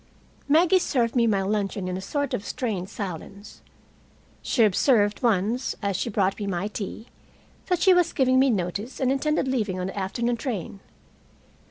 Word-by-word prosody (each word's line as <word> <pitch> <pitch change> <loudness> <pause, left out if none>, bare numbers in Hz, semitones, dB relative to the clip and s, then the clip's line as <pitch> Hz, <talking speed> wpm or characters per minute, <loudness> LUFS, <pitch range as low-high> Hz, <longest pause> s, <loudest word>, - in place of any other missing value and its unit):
Maggie 345 +5 +5
served 240 -8 0
me 235 -2 +3
my 200 -3 +1
luncheon 200 -1 -2
in 180 - -3
a 190 - -4
sort 285 +7 -2
of 200 - -2
strained 195 -2 -3
silence. 200 0 -8 0.8
She 235 - +2
observed 210 0 +3
once, 230 +2 +1
as 200 -2 -2
she 200 - -2
brought 195 -2 0
me 205 - -3
my 195 +2 -2
tea, 215 +1 -6 0.6
that 360 -2 0
she 380 - +7
was 355 -2 +3
giving 260 -2 +3
me 270 +1 +4
notice 200 +3 -2
and 260 -1 +2
intended 290 +1 0
leaving 215 -8 -1
on 180 - -2
the 195 +2 -4
afternoon 235 +5 -1
train. 215 - -4
215 Hz, 170 wpm, -25 LUFS, 195-260 Hz, 0.8 s, she